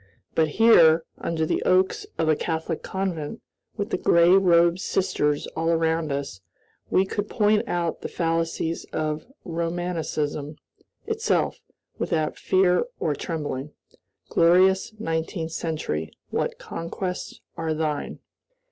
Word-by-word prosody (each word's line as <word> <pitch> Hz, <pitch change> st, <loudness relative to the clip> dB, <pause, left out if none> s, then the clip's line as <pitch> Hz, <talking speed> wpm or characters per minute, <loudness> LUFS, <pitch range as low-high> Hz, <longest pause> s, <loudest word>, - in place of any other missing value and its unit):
But 160 Hz, -1 st, +3 dB
here, 165 Hz, -8 st, +6 dB
under 160 Hz, -1 st, -1 dB
the -, -, 0 dB
oaks 185 Hz, +1 st, +2 dB
of 160 Hz, -, +1 dB
a 155 Hz, -, +4 dB
Catholic 160 Hz, +1 st, -3 dB
convent, 190 Hz, -1 st, -3 dB, 0.4 s
with 205 Hz, +1 st, -3 dB
the -, -, 0 dB
gray 170 Hz, +1 st, +5 dB
robed 175 Hz, -2 st, +5 dB
sisters 165 Hz, -7 st, 0 dB
all 165 Hz, +1 st, 0 dB
around 165 Hz, -1 st, +1 dB
us, 140 Hz, -9 st, -4 dB, 0.5 s
we 190 Hz, -, +3 dB
could 205 Hz, +2 st, -3 dB
point 210 Hz, -1 st, +2 dB
out 170 Hz, -2 st, -1 dB
the -, -, -3 dB
fallacies 165 Hz, -1 st, -1 dB
of 155 Hz, +2 st, -3 dB, 0.2 s
Romanism 165 Hz, -3 st, -2 dB, 0.5 s
itself, 445 Hz, +1 st, 0 dB, 0.4 s
without 155 Hz, -3 st, -1 dB
fear 185 Hz, -1 st, +3 dB
or -, -, 0 dB
trembling. 150 Hz, -4 st, -4 dB, 0.5 s
Glorious 185 Hz, +5 st, +4 dB
Nineteenth 165 Hz, -2 st, -3 dB
Century, 155 Hz, -, -3 dB, 0.2 s
what -, -, -1 dB
conquests 180 Hz, +2 st, -5 dB, 0.2 s
are 160 Hz, -1 st, -2 dB
thine! 155 Hz, -2 st, -2 dB
165 Hz, 120 wpm, -25 LUFS, 160-185 Hz, 0.5 s, here